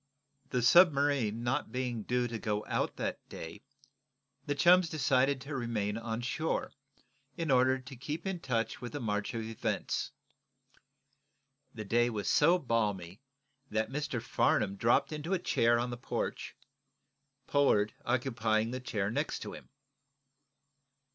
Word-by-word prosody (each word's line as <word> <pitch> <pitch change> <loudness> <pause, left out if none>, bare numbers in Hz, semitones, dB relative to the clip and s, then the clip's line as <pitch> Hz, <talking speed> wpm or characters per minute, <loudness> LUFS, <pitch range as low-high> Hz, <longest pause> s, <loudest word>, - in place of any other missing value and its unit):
The 125 -2 0
submarine 140 - +4
not 130 +4 -1
being 125 -3 -2
due 125 +3 0
to 115 -1 -5
go 105 -1 -2
out - - -1
that - - -3
day, 80 +6 -8 0.9
the 145 - 0
chums 175 +3 +5
decided 135 -2 +2
to 140 +2 -6
remain 110 -5 -2
on 115 0 -3
shore, 155 +6 -2 0.6
in 165 -3 -1
order 130 0 +4
to 130 +1 -11
keep 150 +8 -5
in 190 -2 -2
touch 120 -6 -2
with 120 +2 -6
the 145 - -3
march 105 -3 -2
of 115 - -2
events. 110 0 -2 1.6
The 110 -2 -6
day 120 +3 +2
was 105 -4 -4
so 170 +5 +5
balmy 105 - -2 0.5
that 110 +2 -1
Mr. 140 -3 -2
Farnum 100 -2 +1
dropped 115 +9 +2
into 155 +5 -2
a - - +1
chair 120 -8 +3
on 120 +1 -1
the 120 - -5
porch, 120 - -4 0.9
Pollard 105 -8 +3
occupying 115 -3 0
the 130 - -3
chair 105 -5 -2
next - - -1
to - - -7
him. - - -11
120 Hz, 140 wpm, -31 LUFS, 110-140 Hz, 1.6 s, chums